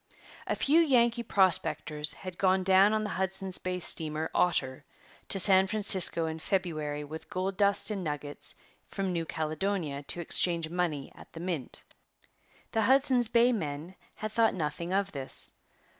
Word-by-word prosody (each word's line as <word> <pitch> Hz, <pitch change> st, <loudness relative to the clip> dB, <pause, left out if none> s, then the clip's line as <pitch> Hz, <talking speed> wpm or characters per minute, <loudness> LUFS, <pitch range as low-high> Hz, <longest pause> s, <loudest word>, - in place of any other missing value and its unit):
A -, -, 0 dB
few 300 Hz, +4 st, +3 dB
Yankee 240 Hz, -6 st, +3 dB
prospectors 170 Hz, -7 st, +1 dB
had 185 Hz, -2 st, -9 dB
gone 190 Hz, 0 st, +2 dB
down 190 Hz, +2 st, +5 dB
on 215 Hz, 0 st, 0 dB
the 210 Hz, -, -4 dB
Hudson's 190 Hz, 0 st, -2 dB
Bay 180 Hz, 0 st, -3 dB
steamer 155 Hz, -2 st, 0 dB
Otter 130 Hz, -7 st, 0 dB, 0.5 s
to -, -, +4 dB
San 190 Hz, 0 st, +6 dB
Francisco 195 Hz, -5 st, +2 dB
in 160 Hz, 0 st, -4 dB
February 155 Hz, -3 st, -2 dB
with 155 Hz, +2 st, -9 dB
gold 185 Hz, +1 st, -3 dB
dust 200 Hz, +2 st, +2 dB
and 195 Hz, -3 st, -3 dB
nuggets 150 Hz, -2 st, -4 dB, 0.3 s
from 195 Hz, -2 st, -3 dB
New 165 Hz, -1 st, -2 dB
Caledonia 155 Hz, -2 st, -2 dB
to 145 Hz, +4 st, -1 dB
exchange 170 Hz, 0 st, 0 dB
for 160 Hz, -, -10 dB
money 165 Hz, -6 st, -2 dB
at -, -, -16 dB
the 165 Hz, -, -8 dB
mint. 170 Hz, -6 st, -4 dB, 0.9 s
The 225 Hz, -, +1 dB
Hudson's 260 Hz, 0 st, +3 dB
Bay 235 Hz, +2 st, +4 dB
men 160 Hz, -5 st, -4 dB, 0.2 s
had 215 Hz, 0 st, -5 dB
thought 225 Hz, -1 st, +2 dB
nothing 170 Hz, +1 st, -3 dB
of 195 Hz, +1 st, 0 dB
this. 135 Hz, -2 st, -5 dB
185 Hz, 160 wpm, -29 LUFS, 160-200 Hz, 0.9 s, San